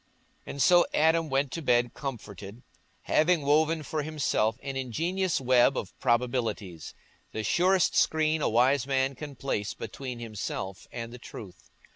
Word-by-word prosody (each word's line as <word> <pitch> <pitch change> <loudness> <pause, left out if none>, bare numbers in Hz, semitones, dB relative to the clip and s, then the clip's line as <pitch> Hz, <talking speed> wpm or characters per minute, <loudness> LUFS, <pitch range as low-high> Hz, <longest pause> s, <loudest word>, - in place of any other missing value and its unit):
And 140 - -1
so 175 +3 +5
Adam 160 +1 +3
went 135 0 0
to 165 - -4
bed 120 -4 +2
comforted, 110 -5 -7 0.4
having 160 0 +2
woven 155 +2 +2
for 155 +1 -3
himself 140 -7 0
an 135 -1 -4
ingenious 165 - -1
web 130 +1 +4
of 95 - -4
probabilities—the 115 - -3
surest 185 - +2
screen 155 0 +2
a - - +2
wise 125 +4 +3
man 135 0 +1
can 145 +1 -8
place 105 -6 -3
between 125 +3 -6
himself 105 -4 -5
and 115 0 -6
the 125 - -9
truth. 100 -5 -11
135 Hz, 140 wpm, -28 LUFS, 115-155 Hz, 0.4 s, so